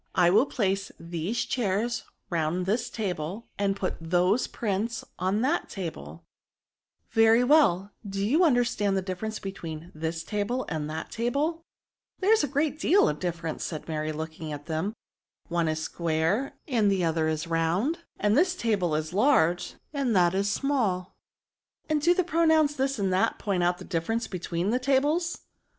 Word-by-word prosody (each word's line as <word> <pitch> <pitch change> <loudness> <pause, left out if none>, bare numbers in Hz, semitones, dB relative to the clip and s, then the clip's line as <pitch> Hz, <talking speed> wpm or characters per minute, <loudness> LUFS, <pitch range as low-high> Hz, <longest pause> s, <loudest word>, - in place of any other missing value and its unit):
I 175 -2 +5
will 220 +9 +5
place 195 -6 -1
these 170 +7 -2
chairs 225 0 -1 0.3
round 170 +2 0
this 225 +5 0
table, 190 0 -4
and 200 -1 +1
put 190 -2 -3
those 180 +7 +2
prints 220 +2 -2
on 190 +4 +1
that 265 +4 0
table/' 85 - -7 0.9
Very 225 +2 +5
well: 245 - +4 0.2
do 195 0 -1
you 300 - +3
understand 240 - +2
the 190 - -1
differ 185 +3 -4
ence 220 0 -4
between 170 -3 -7
this 160 +1 -3
table 215 +5 -2
and 155 -3 -3
that 160 +1 -5
table 260 +7 0
V^ - - -13
^^ - - -29 0.6
There 400 +3 +4
is 445 - +3
a - - +1
great 290 +2 0
deal 375 +6 +4
of 150 0 -1
difference,'* 165 -3 -3
said 155 -3 -5
Mary, 155 -1 -2
looking 160 0 -6
at 145 0 -6
them, 160 +4 -1
*^ - - -8 0.6
one 170 -1 +1
is 155 0 -1
square, 170 +11 0
and 225 -7 +2
the 190 -2 +1
other 160 -1 +1
is 155 -1 -1
round; 170 - 0 0.2
then 210 0 +2
this 355 +8 +3
table 195 - 0
is 155 +2 -2
large, 180 - +3 0.2
and 270 -6 0
that 175 -1 +4
is 195 +1 +1
smalL'' 210 -9 0 0.8
And 305 -1 +1
do 345 +4 +4
the 370 - +2
pronouns 320 -3 +3
this 270 0 0
and 195 -3 0
that 185 - +2
point 195 -4 -1
out 175 0 +2
the - - -10
difference 195 +7 -1
between 180 +1 -2
the 250 - +2
tables 290 +6 +1
195 Hz, 175 wpm, -27 LUFS, 170-245 Hz, 0.9 s, I